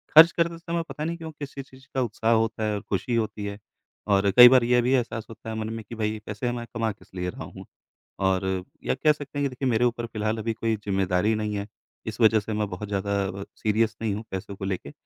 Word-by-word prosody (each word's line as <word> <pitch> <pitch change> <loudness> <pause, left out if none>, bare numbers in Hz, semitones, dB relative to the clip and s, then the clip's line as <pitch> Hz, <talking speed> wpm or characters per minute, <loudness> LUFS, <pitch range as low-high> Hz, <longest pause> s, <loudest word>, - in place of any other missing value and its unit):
ख़र्च 165 +2 +11
करते 170 0 0
समय 170 0 -2
पता 150 - -5
नहीं 170 +2 -2
क्यों 160 -1 -7
किसी 145 -2 -7
किस 135 - -16
चीज़ 130 0 -17
का 130 - +2
उत्साह 115 -1 0
होता 110 -1 +1
है 105 -1 +1
और 100 - -3
खुशी 120 +5 0
होती 110 -2 -1
है। 100 0 -4 0.5
और 100 -1 +3
कई 125 0 +12
बार 130 -2 +6
ये 120 +1 +4
भी 125 +2 +1
एहसास 115 -3 0
होता 110 0 -9
है 110 - -3
मन 110 0 -3
में 115 - -6
कि 115 - -6
भाई 110 -1 -1
पैसे 105 +4 -2
मैं 120 -1 -4
कमा 115 -1 0
किस 100 - -17
लिए 90 0 -2
रहा - - -7
हूँ। - - -10 0.6
और 95 -1 +2 0.4
या - - +1
कह 150 +3 +4
सकते 145 -1 -8
हैं 145 - +1
कि 140 - +2
देखिए 130 +1 -2
मेरे 120 0 +2
ऊपर 120 -1 0
फ़िलहाल 110 0 -2
अभी 115 +1 -1
कोई 110 0 -1
ज़िम्मेदारी 95 0 +1
नहीं 105 -1 -2
है। 100 0 -3 0.4
इस 110 +1 -5
वजह 110 -1 +6
से 105 +2 -6
मैं 105 0 0
बहुत 100 +3 -5
ज़्यादा 100 0 -1 0.3
अ, - - -4
सीरियस 110 +1 +1
नहीं 110 -3 0
हूँ 110 +2 -5
पैसों 95 +1 -5
को 95 - -6
लेके। 95 -2 -3
110 Hz, 255 wpm, -26 LUFS, 105-125 Hz, 0.6 s, कई